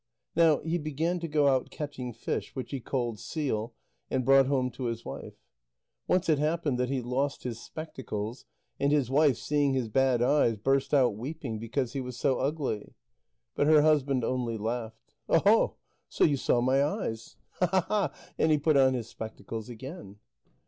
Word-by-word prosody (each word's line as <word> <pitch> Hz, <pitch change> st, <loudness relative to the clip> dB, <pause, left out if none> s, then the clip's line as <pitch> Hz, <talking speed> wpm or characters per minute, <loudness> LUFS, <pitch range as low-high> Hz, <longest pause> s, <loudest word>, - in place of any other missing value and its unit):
Now 160 Hz, -3 st, +4 dB
he 165 Hz, +2 st, -1 dB
began 160 Hz, +4 st, -1 dB
to 165 Hz, -, -4 dB
go 150 Hz, -2 st, +2 dB
out 130 Hz, -2 st, +2 dB
catching 135 Hz, -5 st, -5 dB
fish, 115 Hz, -, -4 dB
which 130 Hz, -, -5 dB
he 135 Hz, -, -3 dB
called 120 Hz, -3 st, -2 dB
seal, 120 Hz, -, -3 dB, 0.3 s
and 130 Hz, -, -1 dB
brought 135 Hz, -1 st, +6 dB
home 130 Hz, -2 st, +1 dB
to 125 Hz, +1 st, -6 dB
his 115 Hz, -1 st, -3 dB
wife. -, -, -7 dB, 0.7 s
Once 180 Hz, 0 st, +2 dB
it 155 Hz, -3 st, +3 dB
happened 150 Hz, -4 st, 0 dB
that 125 Hz, 0 st, 0 dB
he 135 Hz, -1 st, -1 dB
lost 135 Hz, +4 st, -1 dB
his 120 Hz, -2 st, -4 dB
spectacles, 125 Hz, -7 st, -6 dB, 0.3 s
and 140 Hz, +1 st, +2 dB
his 140 Hz, -4 st, +2 dB
wife, 140 Hz, -3 st, +4 dB
seeing 145 Hz, -2 st, +1 dB
his 125 Hz, -4 st, -1 dB
bad 130 Hz, 0 st, +2 dB
eyes, 125 Hz, -3 st, +3 dB
burst 135 Hz, +5 st, +1 dB
out 130 Hz, -7 st, +4 dB
weeping, 125 Hz, -1 st, -5 dB
because 115 Hz, +3 st, -2 dB
he 135 Hz, -, -2 dB
was 125 Hz, -1 st, -7 dB
so 135 Hz, +1 st, +1 dB
ugly. 135 Hz, -6 st, -2 dB, 0.6 s
But 145 Hz, -, +1 dB
her 155 Hz, -1 st, +6 dB
husband 140 Hz, -4 st, +2 dB
only 120 Hz, -2 st, -1 dB
laughed. 110 Hz, +1 st, -5 dB, 0.2 s
"Oho, -, -, +4 dB, 0.3 s
so -, -, +1 dB
you 150 Hz, -, +4 dB
saw 125 Hz, -2 st, +1 dB
my 130 Hz, +3 st, +3 dB
eyes? 145 Hz, -, -3 dB, 0.3 s
Hahaha!" 185 Hz, -1 st, +1 dB, 0.3 s
And 160 Hz, -, +3 dB
he 155 Hz, -, +5 dB
put 150 Hz, 0 st, +3 dB
on 130 Hz, -1 st, +5 dB
his 120 Hz, -3 st, -4 dB
spectacles 110 Hz, 0 st, -7 dB
again. 130 Hz, -, -9 dB
135 Hz, 175 wpm, -29 LUFS, 120-150 Hz, 0.7 s, brought